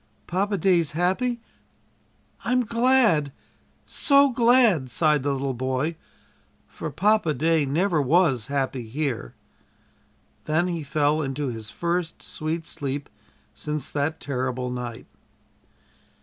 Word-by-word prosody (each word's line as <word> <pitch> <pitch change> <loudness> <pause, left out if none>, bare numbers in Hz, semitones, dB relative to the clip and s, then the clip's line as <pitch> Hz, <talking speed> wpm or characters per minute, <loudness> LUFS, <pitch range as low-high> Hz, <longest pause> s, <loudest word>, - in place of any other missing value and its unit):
"Papa 200 +3 -1
day's 170 -4 +2
happy. 210 +9 0 1.0
I'm 250 +1 +1
glad 230 - +3 0.5
so 280 -1 +4
glad!" 230 - +4
sighed 150 +4 +2
the 140 +1 0
little 135 0 -2
boy 130 +6 -2 0.7
"for 160 - -6
Papa 180 0 +2
day 160 +1 +2
never 165 +3 +1
was 140 -4 +2
happy 135 -4 -2
here." 125 - -3 1.1
Then 160 +4 +1
he 170 -2 -3
fell 150 +1 +1
into 140 0 -2
his 110 -3 -6
first 170 +4 -3
sweet 160 +1 -4
sleep 140 0 -4 0.4
since 150 -2 -5
that 150 +2 -1
terrible 125 -2 -3
night. 120 -2 -6
155 Hz, 110 wpm, -24 LUFS, 135-180 Hz, 1.1 s, so